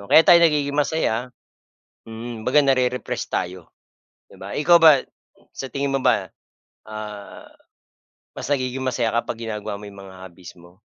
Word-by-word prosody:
oh, 100 - -11
kaya 160 - +8
tayo 175 - +8
nagiging 145 -3 +2
masaya 130 -5 -1 0.8
mm, 115 0 -8
'baga 145 +4 +4
nare-refresh 125 -2 0
tayo 90 -1 -4 0.6
'di - - -16
ba? - - -8
Eh, 150 - -2
ikaw 175 - +8
ba 155 -4 +7 0.5
sa 135 - -6
tingin 140 0 -2
mo - - -6
ba, 100 -2 +2 0.6
ah, 105 -1 -9 0.9
mas - - -5
nagiging 130 -1 -1
masaya 125 -3 0
ka - - -7
pag 115 - -10
ginagawa 105 -2 -5
mo - - -10
'yong 100 -1 -13
mga 95 - -13
hobbies 90 0 -14
mo? 85 +1 -19
120 Hz, 165 wpm, -22 LUFS, 105-140 Hz, 0.9 s, kaya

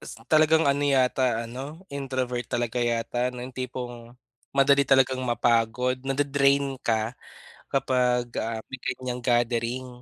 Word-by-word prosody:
s - - -9
talagang 155 +1 +4
ano 140 +1 +1
yata 130 -3 +2
ano, 140 +9 -8
introvert 130 -3 -2
talaga 120 0 -1
yata 120 +1 0
'no, 125 - -8
yung 130 - -9
tipong 120 -1 -6 0.4
madali 140 0 +4
talagang 130 -1 +4
mapagod, 120 +1 +1
nade-drain 140 0 +1
ka 110 0 0 0.6
kapag, 125 -2 +1
ah, 115 0 -2
may 130 - -7
ganiyang 125 -1 -4
gathering 120 +1 0
125 Hz, 125 wpm, -26 LUFS, 120-135 Hz, 0.6 s, talagang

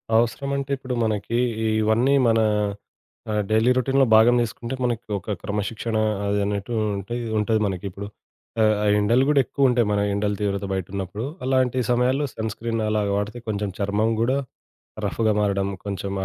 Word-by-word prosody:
అవసరం 120 +4 +1
అంటే 140 0 -4
ఇప్పుడు 130 -1 -5
మనకి 110 +1 -1 0.3
ఈ - - +2 0.2
ఇవన్నీ 115 +6 +3
మన 115 0 +3 0.9
ఆహ్, 105 0 +1
డైలీ 110 +3 +3
రొటీన్‌లొ 135 +2 +3
భాగం 110 +3 +6
చేసుకుంటే 120 +2 -4
మనకి 120 -1 -1
ఒక 100 +2 -4
క్రమశిక్షణ 105 +2 -3 0.3
అది 100 0 +1
అనట్టు 100 +3 -3 0.2
ఉంటే 100 +4 -6
ఇదుంటది 110 0 0
మనకి 95 -2 -3
ఇప్పుడు. 100 +2 -7 0.5
ఆహ్, 110 -1 +4
ఆ! - - +1
ఎండలు 115 +5 +3
గూడా 150 -2 +4
ఎక్కువుంటాయి 125 -5 +2
మన 105 - +1
ఎండల 100 +1 0
తీవ్రత 100 -1 -1
బయటున్నప్పుడు. 95 +3 -4 0.2
అలాంటి 130 -1 +2
సమయాల్లో 130 +4 +2
సన్ 110 0 -3
స్క్రీన్ 115 0 -3
అలాగా 105 -2 0
వాడితే 105 +4 -3
కొంచెం 105 -2 -2
చర్మం 105 +3 +1
గూడా 125 +4 +2 0.7
రఫ్ఫుగా 110 -2 +1
మారడం 100 -1 +1 0.2
కొంచెం, 100 -1 -4
110 Hz, 155 wpm, -23 LUFS, 100-120 Hz, 0.9 s, భాగం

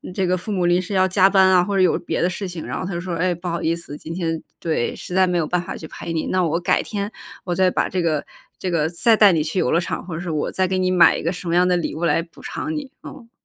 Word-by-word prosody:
这 190 - +1
个 185 +1 +1
父 210 +4 -6
母 180 -3 0
临 175 +1 +3
时 190 +2 -6
要 185 0 +3
加 190 +1 +4
班 190 -1 +5
啊， 180 -1 +5
或 200 +2 -2
者 190 - +3
有 180 - +3
别 - - -3
的 175 - +2
事 195 +2 -4
情， 175 -3 -7
然 - - -4
后 - - -4
他 185 - -4
就 170 - -3
说： 185 -1 -4
“唉， 180 +1 0
不 175 +2 -8
好 170 -1 -2
意 165 +1 +1
思， 170 -3 -9
今 160 - -7
天 165 -2 -2 0.2
对， 155 -8 -1
实 - - -8
在 185 0 +4
没 180 -1 0
有 160 - +1
办 175 +2 0
法 175 - -6
去 160 - -8
陪 165 - -6
你。 160 - -1
那 185 -1 +1
我 165 +1 0
改 175 - +2
天 205 0 -4 0.3
我 180 - -2
再 185 +1 +3
把 - - 0
这 185 -1 -1
个 155 -3 0 0.3
这 185 - -3
个 160 -2 +1
再 220 +7 +3
带 205 -3 +7
你 155 -2 +1
去 165 +4 -2
游 - - +1
乐 170 - +3
场， 170 - -4
或 165 -3 -5
者 175 -1 -4
我 150 - -1
再 185 0 +1
给 185 0 -1
你 185 0 +1
买 185 -1 +5
一 - - -5
个 165 - -1
什 180 0 -7
么 170 - +1
样 180 +1 +4
的 180 -1 +3
礼 170 - -3
物 170 +2 -2
来 165 - +2
补 170 - -17
偿 315 - -4
你。” 285 -4 -5
嗯。 235 -5 -11
180 Hz, 345 characters per minute, -21 LUFS, 170-185 Hz, 0.3 s, 带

